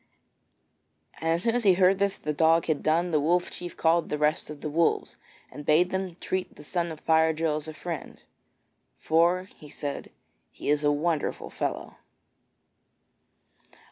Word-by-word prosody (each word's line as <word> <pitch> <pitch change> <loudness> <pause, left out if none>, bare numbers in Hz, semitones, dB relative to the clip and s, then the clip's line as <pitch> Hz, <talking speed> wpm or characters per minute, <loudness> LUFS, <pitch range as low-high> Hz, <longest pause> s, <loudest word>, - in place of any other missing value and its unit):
And 165 - -2
as 165 +2 +1
soon 230 - +2
as 245 0 0
he 190 -3 +5
heard 190 +1 +4
this 200 -1 +1
that - - -30
the 150 - 0
dog 165 +2 +3
had 155 -3 0
done, 170 +3 +1
the 155 - +3
Wolf 175 +4 +1
Chief 175 -1 -8
called 165 0 +2
the 150 - -1
rest 150 +1 0
of 150 -1 -9
the - - -3
Wolves, 165 +3 0 0.4
and 145 - -9
bade 160 +5 +3
them 190 -2 -3
treat 185 -1 -3
the - - -13
son 170 +2 -2
of 155 - -9
Fire 160 0 +3
drill 155 -1 0
as 155 - -6
a 155 - -6
friend, 170 -1 -7 0.7
'for,' 175 +3 +2 0.2
said 145 -1 -5 0.4
he, - - -12
'he - - 0
is 150 0 +1
a 145 - +4
wonderful 155 +1 -1
fellow.' - - -4
165 Hz, 175 wpm, -27 LUFS, 150-180 Hz, 0.7 s, he